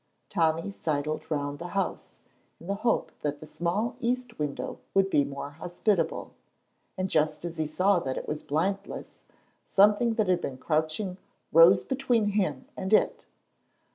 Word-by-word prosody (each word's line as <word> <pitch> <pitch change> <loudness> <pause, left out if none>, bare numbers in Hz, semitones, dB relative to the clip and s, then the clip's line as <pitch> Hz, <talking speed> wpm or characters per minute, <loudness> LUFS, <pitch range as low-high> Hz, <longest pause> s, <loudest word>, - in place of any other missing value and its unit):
Tommy 165 +1 +1
sidled 155 -4 -2
round 145 -2 -2
the 175 - -5
house 195 - -2 0.5
in - - -13
the 200 - -1
hope 230 +4 0
that 145 -1 -2
the - - -9
small 190 +10 -1
east 245 -2 -2
window 145 -2 -3 0.2
would 195 0 +3
be 145 - +4
more 140 +1 -6
hospitable, 175 +3 -1 0.7
and 185 0 0
just 155 -1 +1
as 170 -1 -5
he 155 - 0
saw 185 +5 +3
that 130 -5 -3
it - - -5
was 150 0 -3
blindless 195 +7 -3 0.4
something 210 +3 +4
that 215 -3 +1
had 180 -2 +2
been 130 - -4
crouching 160 +7 -1 0.3
rose 165 +4 +7
between 245 -5 +1
him 190 -10 0
and 190 +3 -2
it. - - +3
175 Hz, 155 wpm, -28 LUFS, 155-200 Hz, 0.7 s, rose